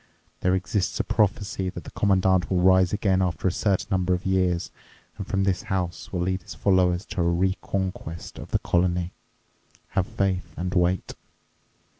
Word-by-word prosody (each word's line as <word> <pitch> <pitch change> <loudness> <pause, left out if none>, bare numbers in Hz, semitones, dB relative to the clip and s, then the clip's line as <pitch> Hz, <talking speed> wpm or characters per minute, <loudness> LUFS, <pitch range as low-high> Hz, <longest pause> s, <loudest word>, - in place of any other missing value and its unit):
There 90 0 +2
exists 95 +1 -1
a - - +2
prophecy 100 -2 0
that - - -7
the - - -10
Commandant 95 -2 +2
will 95 - +1
rise 95 0 +5
again 100 -3 +2
after 90 0 0
a - - +3
certain 95 0 0
number 95 -1 +2
of 90 - -7
years 90 -2 +1 0.5
and 100 - -5
from 95 0 0
this 95 -2 +1
house 90 -2 -2
will 90 - -2
lead 95 +1 -1
his - - -10
followers 90 -1 +2
to 95 -2 -3
a - - +3
re 90 +3 +2
conquest 90 -4 -4
of - - -9
the - - +2
colony. 90 0 0 0.8
Have 95 -1 0
faith 95 -4 -1
and 90 +2 -2
wait!" 90 0 +1
95 Hz, 175 wpm, -25 LUFS, 90-95 Hz, 0.8 s, rise